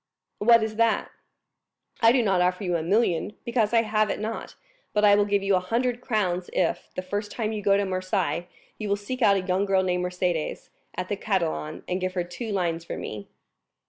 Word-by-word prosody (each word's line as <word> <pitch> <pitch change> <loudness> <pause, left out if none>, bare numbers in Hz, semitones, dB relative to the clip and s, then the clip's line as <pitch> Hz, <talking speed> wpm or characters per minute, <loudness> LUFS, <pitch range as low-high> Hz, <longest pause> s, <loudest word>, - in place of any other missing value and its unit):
"What 230 +1 +6
is 220 0 -4
that?" 230 -1 +2 0.9
"I 225 0 +7
do 250 -1 +3
not 190 -4 +2
offer 180 +2 +1
you 180 -2 0
a 165 - 0
million, 190 +1 +1
because 230 -3 +1
I 230 -1 +4
have 215 -1 +1
it - - -2
not; 220 +1 -5 0.4
but 210 0 +3
I 205 - +7
will 205 0 +4
give 200 -1 +1
you 195 0 +2
a - - +3
hundred 240 +6 -1
crowns 185 -7 -1
if, - - 0
the 185 - -3
first 205 +3 -3
time 220 -2 -2
you 215 -1 -3
go 200 0 +4
to 200 - +1
Marseilles, 185 -3 -1 0.3
you 215 -2 -3
will 200 - +3
seek 230 +6 -6
out 200 -3 +5
a - - 0
young 185 +1 0
girl 190 -1 +3
named 180 -1 0
Mercédès, 180 -3 -2 0.3
at - - -3
the - - -1
Catalans, 75 -1 -2
and 180 +1 -2
give 185 0 -2
her 180 - 0
two 180 +6 -6
lines 170 -4 -1
from - - -6
me." 105 -2 -6
200 Hz, 215 wpm, -26 LUFS, 180-215 Hz, 0.9 s, I